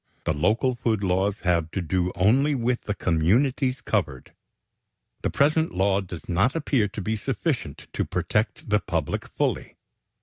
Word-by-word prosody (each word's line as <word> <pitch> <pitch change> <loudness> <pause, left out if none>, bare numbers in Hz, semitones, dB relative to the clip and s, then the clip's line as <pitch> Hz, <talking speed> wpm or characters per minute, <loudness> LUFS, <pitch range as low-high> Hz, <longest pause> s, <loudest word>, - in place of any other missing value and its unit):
The - - 0
local 110 - +2
food 115 -4 -1
laws 95 +2 0
have 85 -3 +1
to - - -1
do 90 +1 0
only 130 +10 +3
with 120 0 0
the 105 - -2
communities 125 - +1
covered. 65 -2 -2 0.9
The - - 0
present 155 +3 +2
law 95 +1 +2
does 90 -3 -9
not 100 - +2
appear 140 -9 +1
to 105 - -6
be 110 +4 -1
sufficient 115 - -3
to - - 0
protect 105 -1 -1
the 105 -1 +3
public 80 -7 -2
fully. - - -2
105 Hz, 155 wpm, -25 LUFS, 90-125 Hz, 0.9 s, only